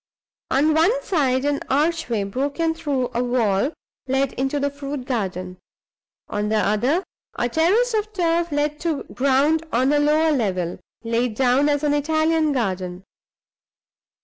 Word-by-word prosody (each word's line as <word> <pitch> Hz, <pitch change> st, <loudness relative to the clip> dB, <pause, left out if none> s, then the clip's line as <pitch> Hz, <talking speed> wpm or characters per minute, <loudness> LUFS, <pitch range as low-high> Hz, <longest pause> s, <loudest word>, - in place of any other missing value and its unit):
On 295 Hz, +4 st, +3 dB
one 390 Hz, +11 st, +2 dB
side, 270 Hz, -7 st, +1 dB
an 290 Hz, -1 st, +1 dB
archway, 290 Hz, -6 st, +1 dB
broken 280 Hz, +10 st, -1 dB
through, 285 Hz, -6 st, -2 dB
a 240 Hz, -, 0 dB
wall, 240 Hz, 0 st, +1 dB, 0.4 s
led 270 Hz, 0 st, 0 dB
into 270 Hz, +2 st, -1 dB
the 285 Hz, 0 st, 0 dB
fruit 280 Hz, -2 st, -6 dB
garden. 185 Hz, -7 st, -3 dB, 0.7 s
On 210 Hz, -1 st, -2 dB
the 220 Hz, -, +1 dB
other, 240 Hz, -, +1 dB, 0.3 s
a 240 Hz, -, 0 dB
terrace 385 Hz, -, +2 dB
of 430 Hz, 0 st, -1 dB
turf 340 Hz, -3 st, 0 dB
led 295 Hz, +1 st, -1 dB
to 325 Hz, -4 st, -2 dB
ground 280 Hz, +5 st, +2 dB
on 260 Hz, +4 st, +2 dB
a 295 Hz, -, +3 dB
lower 305 Hz, +2 st, +3 dB
level, 185 Hz, -, -1 dB, 0.2 s
laid 230 Hz, 0 st, -1 dB
out 265 Hz, +3 st, +3 dB
as 290 Hz, 0 st, 0 dB
an 295 Hz, -1 st, +2 dB
Italian 315 Hz, +1 st, +1 dB
garden. 185 Hz, -7 st, -2 dB
280 Hz, 145 wpm, -22 LUFS, 240-315 Hz, 0.7 s, On